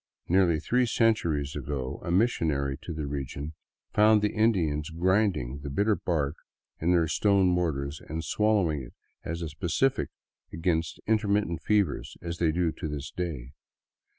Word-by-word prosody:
Nearly 85 -3 +3
three 125 +8 +1
centuries 85 -12 +1
ago 70 -2 -4
a 85 - -4
missionary 80 - +1
to - - -7
the 75 -2 -3
region 70 +2 -5 0.4
found 105 0 +5
the 105 - +1
Indians 85 -10 +1
grinding 90 - +1
the 70 0 -6
bitter 100 +9 +2
bark 75 -6 -1 0.4
in 80 - 0
their 85 -2 +3
stone 100 +3 +3
mortars 80 -6 0
and 80 +2 -3
swallowing 100 -6 +2
it - - -11 0.3
as 85 +1 -4
a 80 - -3
specific 90 - 0 0.4
against 80 -1 -1
in 110 0 +3
termittent 100 -6 0
fevers, 100 -9 0
as 85 0 -5
they 80 -2 +3
do 85 0 +1
to 80 - -5
this 75 -1 -5
day. 75 -9 -4
85 Hz, 150 wpm, -28 LUFS, 75-100 Hz, 0.4 s, found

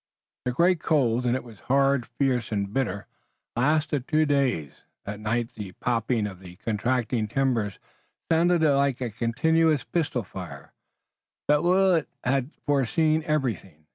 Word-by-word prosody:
The 125 - +1
great 170 +6 +3
cold, 125 -6 +1
and 120 - +2
it 130 - -3
was 115 -4 -14
hard, 135 -2 +2
fierce 125 -5 -1
and 100 -1 -2
bitter, 100 -7 -1 0.5
lasted 145 +1 +1
two 155 -1 +3
days. 130 - 0 0.2
At 105 +1 -5
night 115 +2 -2
the 100 -4 -8
popping 115 -2 0
of 95 -3 -6
the 90 -2 -12
contracting 115 +2 -1
timbers 115 -5 0 0.5
sounded 170 +1 +3
like 140 -3 +3
a 125 -3 -3
continuous 150 +7 +2
pistol 145 -8 -1
fire, - - -9 0.7
but 150 0 +4
Willet 180 -2 +3
had 130 +1 0 0.2
foreseen 155 +3 +2
everything. 110 - -2
125 Hz, 140 wpm, -26 LUFS, 110-150 Hz, 0.7 s, but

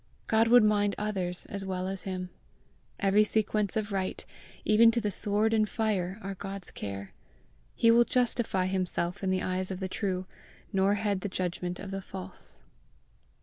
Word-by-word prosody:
God 225 +1 +3
would 240 0 +7
mind 205 -1 +3
others 190 -4 -2
as 200 -1 -6
well 185 -1 -2
as 195 0 -5
him! 185 -1 -4 0.7
Every 200 +1 +4
sequence 215 -1 0
of 215 -1 -2
right, 190 -1 -2 0.4
even 220 +2 +7
to 230 +1 +2
the 210 -2 -1
sword 210 +3 +1
and 215 -2 +3
fire, 200 -5 -1
are 195 0 -3
God's 195 0 -7
care; 100 -1 -6 0.6
he 230 - +5
will 235 +1 +7
justify 235 -6 +1
himself 185 -1 -1
in 190 - +1
the 185 0 +1
eyes 185 0 -1
of 190 -1 -4
the 190 - -2
true, 185 -1 -2 0.5
nor 195 +1 +3
heed 205 -2 -1
the 205 - -3
judgment 180 -1 -3
of 195 - -7
the 195 0 -3
false. 95 - -8
195 Hz, 170 wpm, -29 LUFS, 185-215 Hz, 0.7 s, would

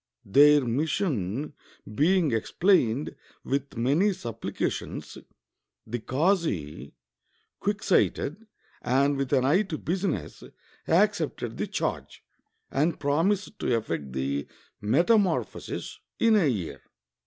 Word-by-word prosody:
Their 145 +8 +6
mission 140 - -1 0.4
being 165 - +3
explained 130 - +1 0.3
with 140 -2 -3
many 145 - +3
suppHcations, 120 - -4 0.6
the 120 +2 -4
kazi, 115 - -1 0.6
quick 200 +1 -2
sighted, 190 +2 +1 0.3
and 140 +3 +2
with 135 -1 -2
an 130 -3 +3
eye 160 +9 +4
to 190 -7 -4
business, 175 - -3 0.4
accepted - - +1
the - - -2
charge, - - -4 0.5
and 150 +4 0
promised 185 +9 0
to 120 - +1
effect 80 - -4
the 70 +2 -2 0.3
meta 170 - +4
morphosis 185 -5 -3 0.2
in 230 -1 +4
a 190 -7 +4
year. 100 - -3
145 Hz, 105 wpm, -27 LUFS, 115-180 Hz, 0.6 s, Their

